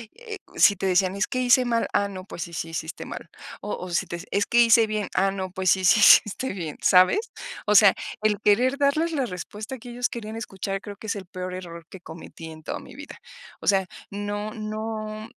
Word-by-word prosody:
eh, 455 -3 -8 0.2
si 200 - +6
te 195 - -3
decían: 185 +1 +2
"Es 205 - 0
que 255 - -2
hice 250 0 +4
mal, 230 -1 0
ah, 200 0 +2
no, 185 -2 -8
pues 175 - -8
sí, 170 - -10
sí, 165 - -4
sí 160 - -3
hiciste - - -7
mal", - - -8 0.3
o 205 - -3
o, 180 - -7
si 170 - 0
te 170 - -5
"Es 200 +1 +1
que 240 - +2
hice 230 -1 +6
bien, 215 -1 -3
ah, 195 +1 +3
no, 190 -1 -5
pues 185 -1 +1
sí, 190 -1 +2
sí, 210 +4 +5
sí - - +9
hiciste 235 +4 -4
bien", 165 -6 -6
¿sabes? 185 - +5 0.5
O 210 - +3
sea, 200 -2 +8 0.3
el 210 -2 +1
querer 250 +7 +3
darles 295 +4 +1
la 280 -5 0
respuesta 210 +5 -7
que 245 +1 -11
ellos 245 +1 -1
querían 220 -2 -7
escuchar 195 -2 -4
creo 205 -1 -8
que 220 - -11
es 205 - -1
el 190 - -8
peor 185 0 -6
error 170 -2 -8
que 190 - -11
cometí 165 0 -11
en 155 0 -12
toda - - -4
mi - - -13
vida. - - -10 0.4
O - - -10
sea, 195 -2 +3 0.2
no 205 +1 -4
no, 215 -1 -5
205 Hz, 235 wpm, -25 LUFS, 185-225 Hz, 0.5 s, sí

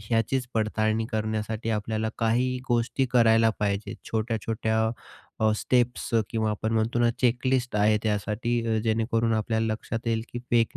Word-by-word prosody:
ह्याचीच 115 +4 0
पडताळणी 110 0 +1
करण्यासाठी 110 +1 -2
आपल्याला 110 +1 -1
काही 125 +3 +1
गोष्टी 120 +2 +1
करायला 115 -2 +5
पाहिजेत, 100 0 -1 0.2
छोट्या-छोट्या 110 0 -1 0.6
अ, 110 0 +4
स्टेप्स 125 +1 0 0.2
किंवा 110 -1 0
आपण 110 +1 -2
म्हणतो 110 +2 +1
ना 120 0 +4
चेकलिस्ट 125 -1 +1
आहे 105 +1 +4
त्यासाठी, 110 +2 0
जेणेकरून 115 +1 +1
आपल्याला 110 +1 0
लक्षात 115 +1 -5
येईल 115 -1 +1
की 120 - -3
फेक 115 -1 +2
115 Hz, 135 wpm, -26 LUFS, 110-120 Hz, 0.6 s, करायला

